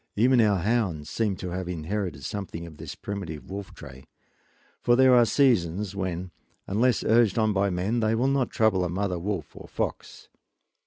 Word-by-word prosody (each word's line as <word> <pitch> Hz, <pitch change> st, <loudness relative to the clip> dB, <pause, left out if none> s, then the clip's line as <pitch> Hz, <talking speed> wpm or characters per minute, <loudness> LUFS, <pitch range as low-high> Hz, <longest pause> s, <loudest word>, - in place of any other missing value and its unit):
Even 120 Hz, +3 st, +4 dB
our 105 Hz, -3 st, +3 dB
hounds 90 Hz, -6 st, -1 dB
seem 105 Hz, -4 st, 0 dB
to 90 Hz, 0 st, -6 dB
have 90 Hz, 0 st, -4 dB
inherited 90 Hz, -3 st, -4 dB
something 90 Hz, -5 st, -5 dB
of 80 Hz, -3 st, -12 dB
this -, -, -8 dB
primitive 95 Hz, -6 st, -6 dB
wolf 100 Hz, -1 st, -6 dB
trait, 70 Hz, -2 st, -12 dB, 0.7 s
for 120 Hz, -, +4 dB
there 130 Hz, 0 st, +6 dB
are 120 Hz, -1 st, +6 dB
seasons 100 Hz, -, +1 dB
when, 90 Hz, -2 st, -3 dB, 0.3 s
unless 115 Hz, +5 st, +1 dB
urged 115 Hz, -2 st, +3 dB
on 110 Hz, -1 st, +2 dB
by 100 Hz, 0 st, +1 dB
men, 95 Hz, +6 st, -1 dB
they 110 Hz, 0 st, +1 dB
will 125 Hz, +4 st, +1 dB
not 135 Hz, -3 st, +1 dB
trouble 110 Hz, -5 st, +2 dB
a 90 Hz, -, -1 dB
mother 90 Hz, 0 st, -2 dB
wolf 90 Hz, -4 st, -4 dB
or -, -, -11 dB
fox. -, -, -5 dB
100 Hz, 175 wpm, -26 LUFS, 90-115 Hz, 0.7 s, there